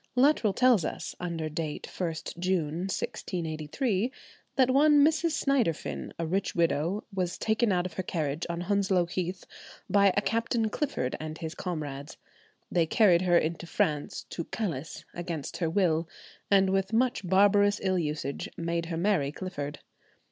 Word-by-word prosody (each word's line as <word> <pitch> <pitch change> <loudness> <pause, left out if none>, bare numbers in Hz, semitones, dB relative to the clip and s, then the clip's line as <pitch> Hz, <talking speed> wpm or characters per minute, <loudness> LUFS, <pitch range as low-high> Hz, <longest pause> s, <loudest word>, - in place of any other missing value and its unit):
Luttrell 255 -4 +4
tells 245 -4 +4
us, - - -4
under 170 -3 -3
date 155 -1 -4
1st 165 -1 -4
June, 175 -4 0
1683, 185 - -2 0.4
that 260 -2 +4
one 290 +1 +6
Mrs. 320 +1 +1
Synderfin, 255 - 0
a 165 - -2
rich 185 +4 -1
widow, 170 +4 +1
was 180 -2 -1
taken 220 0 +1
out 180 -1 +1
of 180 - -5
her 175 - -2
carriage 155 -4 -2
on 170 0 -2
Hounslow 190 -1 +2
Heath, 180 +1 -4 0.4
by 200 -1 +5
a - - +4
Captain 230 0 0
Clifford 265 - -1
and 155 0 -5
his 160 -1 -5
comrades. 150 -6 -5 0.5
They 170 -2 +2
carried 180 -3 +5
her 175 -2 +4
into 165 +1 -1
France 150 -3 -1
to 170 - -4
"Calice" 165 -9 -4
against 170 -4 -5
her 165 -3 0
will, 165 -2 +1 0.4
and 195 -1 +4
with 195 +2 0
much 245 -1 +2
barbarous 205 +2 +4
ill 185 -1 +2
usage 150 -3 -3
made 170 0 -2
her 165 -1 -3
marry 175 -6 +1
Clifford. 145 -5 -5
180 Hz, 150 wpm, -29 LUFS, 160-205 Hz, 0.5 s, one